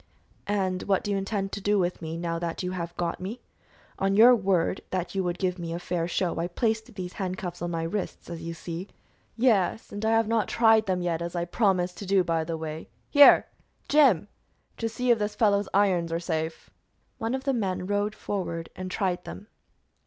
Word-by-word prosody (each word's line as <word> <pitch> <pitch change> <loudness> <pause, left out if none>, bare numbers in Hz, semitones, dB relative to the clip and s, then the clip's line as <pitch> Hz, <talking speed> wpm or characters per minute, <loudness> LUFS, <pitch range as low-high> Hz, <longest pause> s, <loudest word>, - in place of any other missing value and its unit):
"And 190 -3 0
what 195 -2 +1
do 205 - -2
you 200 - +1
intend 195 0 -2
to 200 - -5
do 205 +1 +2
with 180 -2 0
me, 160 0 -4
now 165 -1 -2
that 170 +1 -3
you 180 - -2
have 170 -2 -5
got 170 -1 -2
me? 215 +7 -6 0.6
On 195 0 +1
your 235 +4 +8
word 190 -4 +1
that 180 -2 -3
you 195 -1 0
would 175 0 -2
give 185 -1 -1
me 165 -1 -4
a - - -2
fair 175 -1 -2
show, 175 -1 -1
I 170 - 0
placed 220 +4 -2
these 180 -2 -5
handcuffs 185 -2 -4
on 175 - -2
my 165 -1 -2
wrists, 190 +4 -4
as 170 -1 -6
you 165 0 -5
see." 170 +3 -6 0.5
"Yes, 225 -3 +2
and 205 +1 -6
I 220 - +2
have 225 -1 +3
not 225 -3 +1
tried 225 -2 +4
them 180 -1 0
yet, 170 -1 -1
as 170 +1 -4
I 170 0 -1
promised 180 -2 +1
to 200 - -7
do, 195 -1 +4
by 165 -2 0
the 165 0 -4
way. 160 0 -6 0.2
Here, 285 -1 +8 0.4
Jim, 260 - +4 0.5
just 225 -1 -4
see 250 0 +2
if 230 - +4
this 210 0 -2
fellow's 205 -3 +2
irons 185 -4 +2
are 165 - 0
safe." 160 -2 -4 0.5
One 225 +3 -1
of 265 - -5
the 275 0 +1
men 190 -6 -1
rode 205 +2 -1
forward 170 -5 -4
and 185 0 -5
tried 185 -1 -1
them. 205 - -9
185 Hz, 210 wpm, -27 LUFS, 170-210 Hz, 0.6 s, your